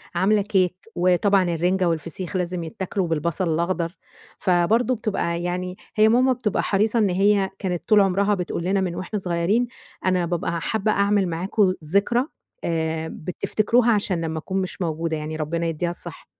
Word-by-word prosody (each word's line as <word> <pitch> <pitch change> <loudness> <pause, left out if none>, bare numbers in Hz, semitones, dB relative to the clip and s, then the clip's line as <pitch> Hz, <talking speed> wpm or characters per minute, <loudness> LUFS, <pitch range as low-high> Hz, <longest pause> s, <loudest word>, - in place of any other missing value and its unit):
عاملة 210 +2 +3
كيك، 190 -3 +1 0.2
وطبعًا 185 +2 +3
الرنجة 175 +2 +1
والفسيخ 165 +3 -3
لازم 180 -1 -1
يتاكلوا 180 +3 -3
بالبصل 165 +2 0
الاخضر. 170 +1 -1 0.4
فبرضو 215 +8 +2
بتبقى 175 -6 -2
يعني 180 +1 -3 0.2
هي 215 0 +5
ماما 255 +3 +4
بتبقى 230 -5 -1
حريصة 215 +3 +2
إن 205 -3 +3
هي 195 +1 +3
كانت 180 -3 -3
طول 210 -1 +7
عمرها 200 +2 +2
بتقول 180 -2 -3
لنا 190 +2 +1
من 175 -2 -2
وإحنا 185 +3 -3
صغيرين: 185 +7 +1 0.4
"أنا 185 -2 +2
بابقى 170 -1 -2
حابة 215 +3 0
أعمل 200 -1 +2
معاكم 185 +3 +1
ذكرى 200 - +2 0.4
آآ، 160 -1 -1
بتفتكروها 220 +9 +1
علشان 195 -5 0
لما 160 -1 -2
أكون 190 +4 -2
مش 185 0 -5
موجودة"، 160 -1 -1
يعني 155 +1 -5
ربنا 165 +2 -2
يديها 165 +2 -1
الصحة. 175 - -8
185 Hz, 155 wpm, -23 LUFS, 170-205 Hz, 0.4 s, طول